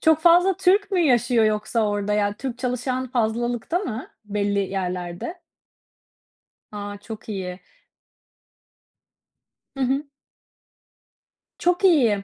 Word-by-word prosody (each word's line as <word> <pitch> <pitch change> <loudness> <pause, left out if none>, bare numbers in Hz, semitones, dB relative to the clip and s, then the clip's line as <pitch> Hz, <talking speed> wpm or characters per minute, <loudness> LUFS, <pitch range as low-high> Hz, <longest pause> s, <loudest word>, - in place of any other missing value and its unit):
Çok 320 -1 +4
fazla 350 +2 +5
Türk 390 +2 +3
mü 375 - +2
yaşıyor 240 -6 +3
yoksa 215 +1 +1
orada? 205 0 -1
Ya, 205 -1 +1
Türk 250 -1 -5
çalışan 255 0 -2
fazlalıkta 240 +5 0
mı 255 - -5 0.2
belli 205 -1 -1
yerlerde? 185 - -3 1.3
A! 205 -1 -6
Çok 220 +1 -9
iyi. 185 -3 -4 2.2
Hı 270 - -2
hı. 270 +4 0 1.5
Çok 355 +3 +1
iyi. 240 - +4
235 Hz, 105 wpm, -23 LUFS, 205-300 Hz, 2.2 s, fazla